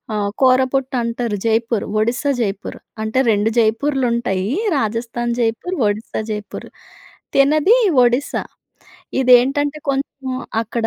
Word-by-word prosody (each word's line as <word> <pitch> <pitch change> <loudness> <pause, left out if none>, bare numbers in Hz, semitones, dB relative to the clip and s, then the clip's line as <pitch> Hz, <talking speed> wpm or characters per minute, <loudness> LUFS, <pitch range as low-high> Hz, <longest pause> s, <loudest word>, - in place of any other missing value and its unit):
ఆహ్, 205 -1 -1
కోరాపుట్ 260 +1 +2
అంటారు, 230 -2 -2
జైపూరు. 225 -1 0 0.2
ఒడిస్సా 245 +6 0
జైపూరు. 200 -2 -4 0.2
అంటే, 220 +4 0
2 210 +1 +1
జైపూర్‌లుంటాయి, 235 -4 0 0.3
రాజస్థాన్ 230 +1 -2
జైపూర్, 230 +11 -1
ఒడిస్సా 210 +1 -3
జైపూర్. 210 -1 -6 0.7
తినది 300 - +4 0.3
ఒడిస్సా. 245 +4 +1 0.8
ఇదేంటంటే 270 +4 +3
కొంచెం 275 -1 -3 0.3
అక్కడ 230 +1 -2
240 Hz, 100 wpm, -19 LUFS, 220-270 Hz, 0.8 s, తినది